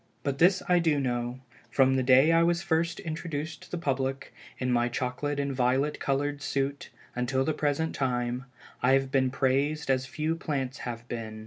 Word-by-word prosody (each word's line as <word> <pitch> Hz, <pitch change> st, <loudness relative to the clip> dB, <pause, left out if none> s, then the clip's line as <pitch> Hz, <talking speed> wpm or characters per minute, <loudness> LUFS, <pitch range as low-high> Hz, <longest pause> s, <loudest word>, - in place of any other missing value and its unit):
But 140 Hz, -1 st, -2 dB
this 185 Hz, +2 st, +4 dB
I 180 Hz, -1 st, +4 dB
do 160 Hz, -4 st, +2 dB
know, 120 Hz, -1 st, -2 dB, 0.3 s
from 135 Hz, -1 st, +4 dB
the 130 Hz, -, +2 dB
day 130 Hz, +4 st, +6 dB
I 165 Hz, 0 st, +5 dB
was 170 Hz, 0 st, +2 dB
first 165 Hz, +1 st, 0 dB
introduced 160 Hz, -1 st, -4 dB
to -, -, -14 dB
the 180 Hz, -, -3 dB
public, 135 Hz, -4 st, -2 dB, 0.2 s
in 125 Hz, -1 st, -1 dB
my 120 Hz, 0 st, +2 dB
chocolate 130 Hz, +4 st, -2 dB
and 140 Hz, -1 st, -1 dB
violet 130 Hz, +3 st, +1 dB
colored 145 Hz, +1 st, -1 dB
suit 140 Hz, 0 st, -2 dB, 0.3 s
until 130 Hz, +2 st, 0 dB
the 155 Hz, -, +1 dB
present 150 Hz, +2 st, 0 dB
time, 125 Hz, -1 st, -1 dB, 0.4 s
I 125 Hz, +2 st, +4 dB
have 135 Hz, 0 st, +2 dB
been 130 Hz, -1 st, +3 dB
praised 135 Hz, +3 st, +1 dB
as 130 Hz, 0 st, 0 dB
few 155 Hz, +3 st, -1 dB
plants 140 Hz, -5 st, -3 dB
have 120 Hz, 0 st, -7 dB
been. 110 Hz, -3 st, -5 dB
135 Hz, 185 wpm, -28 LUFS, 130-150 Hz, 0.4 s, day